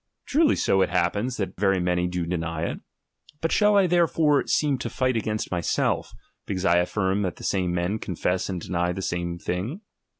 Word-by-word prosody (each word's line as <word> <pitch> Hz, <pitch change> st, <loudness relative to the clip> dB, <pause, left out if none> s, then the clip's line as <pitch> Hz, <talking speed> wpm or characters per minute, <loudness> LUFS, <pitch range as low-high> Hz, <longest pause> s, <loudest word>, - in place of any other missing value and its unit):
Truly 305 Hz, +1 st, +3 dB
so 95 Hz, -, +2 dB
it -, -, +2 dB
happens, 100 Hz, +8 st, 0 dB
that 100 Hz, -, -3 dB
very 95 Hz, -2 st, +3 dB
many 90 Hz, 0 st, +1 dB
do 90 Hz, -1 st, -2 dB
deny 85 Hz, -2 st, -3 dB
it. -, -, -3 dB, 0.6 s
But 165 Hz, -, -1 dB
shall 210 Hz, -1 st, +4 dB
I 195 Hz, -, +5 dB
therefore 165 Hz, -4 st, +2 dB
seem 145 Hz, -4 st, +1 dB
to 115 Hz, -, -3 dB
fight 130 Hz, +2 st, 0 dB
against 110 Hz, -1 st, -2 dB
myself, 85 Hz, -3 st, 0 dB, 0.4 s
because 95 Hz, -1 st, -2 dB
I 85 Hz, -2 st, +4 dB
affirm 95 Hz, +2 st, +1 dB
that 90 Hz, -6 st, -2 dB
the -, -, -12 dB
same 90 Hz, -2 st, 0 dB
men 90 Hz, +5 st, -1 dB
confess 90 Hz, 0 st, -2 dB
and 90 Hz, -2 st, -3 dB
deny 90 Hz, +1 st, -1 dB
the 95 Hz, -, -5 dB
same 85 Hz, -2 st, -2 dB
thing 100 Hz, -, -4 dB
95 Hz, 190 wpm, -25 LUFS, 90-120 Hz, 0.6 s, I